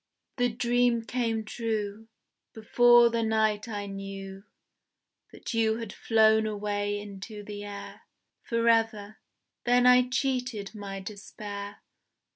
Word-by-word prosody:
The 245 -1 +2
dream 240 0 +1
came 225 -2 -1
true. 220 -1 -3 0.5
Before 240 +2 +5
the 230 0 0
night 220 -1 +1
I 205 -3 -4
knew 195 0 -8 0.9
That - - -7
you 220 -1 +2
had 230 -3 -6
flown 220 -1 +3
away 205 -1 -2
into 205 +1 -9
the 205 0 -7
air 205 -1 -8 0.4
Forever. 225 -2 +1 0.4
Then 245 +1 +3
I 250 0 +6
cheated 250 -6 -2
my 200 -2 -7
despair. 205 0 -8
220 Hz, 110 wpm, -28 LUFS, 205-235 Hz, 0.9 s, I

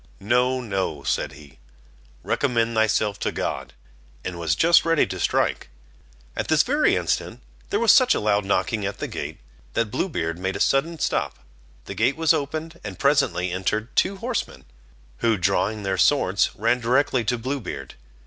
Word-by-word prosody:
"No, 125 +5 +1
no," 95 - -3
said 70 0 -1
he, 70 -2 -15 0.6
"recommend 115 -4 0
thyself 110 -2 +1
to - - -1
God," - - -4 0.5
and 90 -2 -5
was 80 -3 0
just 170 - +5
ready 165 -2 +3
to 95 -1 -6
strike. - - 0 0.7
At - - -3
this - - +4
very - - +2
instant - - -2 0.3
there 205 - 0
was 230 -3 +6
such 255 -1 +5
a - - 0
loud 105 -1 +1
knocking 100 +2 0
at 100 0 -3
the - - -4
gate, - - -6 0.4
that 115 -3 -1
Blue 190 - -1
Beard 85 - -3
made 95 +1 -2
a - - -4
sudden 160 +5 +1
stop. - - -1 0.5
The - - -6
gate 110 +9 +1
was 160 -1 +4
opened, 160 +2 -4
and 100 -3 -7
presently 140 -11 +2
entered 105 +5 -2
two 195 +2 +2
horsemen, 235 +3 -4 0.5
who 115 -2 +1
drawing 100 +3 0
their 95 -1 -1
swords, 100 -9 +3
ran 115 +4 +1
directly 125 +1 +1
to 125 - 0
Blue 130 +5 -3
Beard. 70 - -7
110 Hz, 170 wpm, -23 LUFS, 95-140 Hz, 0.7 s, was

